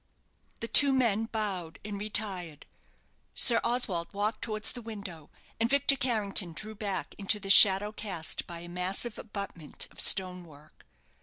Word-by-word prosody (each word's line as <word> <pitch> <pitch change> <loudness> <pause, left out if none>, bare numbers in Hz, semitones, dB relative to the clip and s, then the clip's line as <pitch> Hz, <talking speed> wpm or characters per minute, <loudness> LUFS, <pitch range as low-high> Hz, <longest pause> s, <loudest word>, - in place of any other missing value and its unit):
The 230 - -3
two 280 +3 +6
men 225 -4 0
bowed 195 -7 -6
and 205 -1 -7
retired. 195 -7 -4 0.7
Sir 235 -2 +6
Oswald 235 -8 -2
walked 210 +2 -3
towards 215 -2 -5
the 245 - -8
window: 200 -9 -10 0.3
and 230 +1 0
Victor 280 +1 +3
Carrington 210 -8 -1
drew 215 +6 -5
back 200 -3 -5
into 205 +1 0
the 195 -1 -1
shadow 200 0 +7
cast 190 -7 -5
by 170 -1 -9
a 175 - -11
massive 185 +6 -3
abutment 200 -7 -8
of - - -15
stone 185 -2 +4
work. 150 -2 -20
205 Hz, 150 wpm, -28 LUFS, 180-225 Hz, 0.7 s, shadow